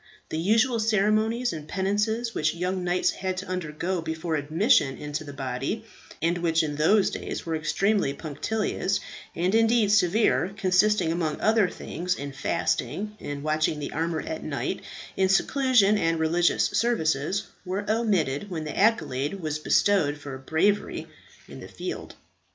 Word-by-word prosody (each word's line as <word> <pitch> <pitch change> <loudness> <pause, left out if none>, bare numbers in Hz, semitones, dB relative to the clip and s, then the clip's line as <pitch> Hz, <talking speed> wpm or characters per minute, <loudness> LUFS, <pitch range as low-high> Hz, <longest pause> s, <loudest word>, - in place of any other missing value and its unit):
The 155 - -2
usual 225 +7 +3
ceremonies 220 +2 +1
and 155 -2 -7
penances 210 +5 -1
which 155 +2 0
young 180 +2 -2
knights 180 0 +1
had 185 -1 -3
to 190 - -4
undergo 180 0 -3
before 160 +1 -3
admission 155 - +2
into 150 +1 -4
the 145 - -8
body 135 - -3 0.4
and 170 +1 +1
which 165 -1 +2
in 150 -2 -3
those 195 +7 +4
days - - -5
were 165 -1 -1
extremely 195 +2 +1
punctilious, 185 +7 -2 0.4
and 180 +3 0
indeed 225 -2 +4
severe, 195 -1 +3
consisting, 190 -2 +3
among 165 -2 -1
other 215 -3 +3
things, 180 +3 -3
in 140 -3 -6
fasting, 150 - -2
in 145 0 -6
watching 155 0 +1
the 145 -1 -5
armour 165 0 -1
at 320 0 -5
night, - - -3 0.3
in 190 0 +2
seclusion 215 0 +3
and 165 -2 +1
religious 165 +2 +2
services 195 -5 0 0.2
were 195 +2 -3
omitted 205 -7 0
when 165 -4 -4
the 150 - -5
accolade 195 - +1
was 155 -3 -3
bestowed 155 -3 +2
for 145 -2 -7
bravery 160 +9 0 0.4
in - - -10
the - - -9
field. - - -6
180 Hz, 150 wpm, -26 LUFS, 155-210 Hz, 0.4 s, those